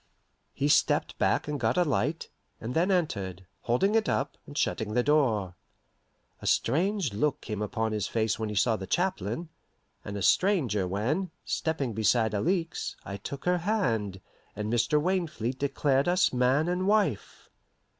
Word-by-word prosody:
He 140 - 0
stepped 145 - +2
back - - +1
and 150 -1 -2
got 115 0 +1
a 180 - +5
light, 150 0 -1 0.3
and 115 +2 -5
then 175 +6 +2
entered, 100 - -1
holding 125 - +1
it 220 -2 +2
up, 145 - -1
and 145 - -9
shutting 110 -1 -1
the 125 - +3
door. 120 -11 +2 0.9
A - - -5
strange 175 - +1
look 145 +7 0
came 105 -3 -5
upon 110 +1 -1
his 105 -3 -1
face 110 -1 0
when 110 -1 -2
he 105 - -4
saw 115 +3 +3
the 95 -3 -6
chaplain, 175 - -1 0.5
and 100 0 -5
a 100 - -3
stranger 130 - +2
when, 130 - -1 0.2
stepping 150 -7 -1
beside 110 +1 +2
Alixe, 165 - -1
I 100 - -5
took 135 +7 -7
her 180 0 +2
hand, 115 - -1 0.3
and 105 +2 -3
Mr. 120 +6 +2
Wainfleet 155 - -1
declared 140 0 +1
us 180 -3 +3
man 130 +5 +2
and 180 +2 0
wife. 200 - 0
130 Hz, 160 wpm, -28 LUFS, 110-170 Hz, 0.9 s, a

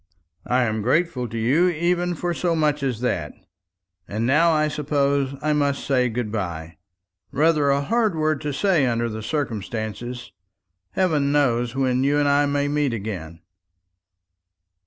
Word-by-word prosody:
"I 125 +1 +2
am 110 -2 -1
grateful 130 +1 0
to 115 - -5
you 140 +11 +3
even 175 +1 0
for 175 +2 -2
so 170 0 0
much 150 -2 +1
as 125 -4 -2
that. 80 - -2 0.7
And 110 +3 -2
now 150 +7 +4
I 155 -1 +2
suppose 140 -2 0
I 155 0 +2
must 145 -1 0
say 125 -3 +2
good 115 -2 -3
bye 85 -6 -5 0.5
rather 150 0 +2
a 140 +1 +2
hard 220 +3 +1
word 155 -2 0
to 150 -1 -3
say 160 -2 +2
under 115 -1 0
the 110 0 -6
circumstances. 120 -2 -4 0.6
Heaven 155 -7 +1
knows 125 -4 +1
when 130 -1 +1
you 145 +1 +2
and 145 -1 +2
I 145 0 +3
may 145 0 0
meet 145 -3 0
again." 90 -6 -6
140 Hz, 155 wpm, -23 LUFS, 120-155 Hz, 0.7 s, now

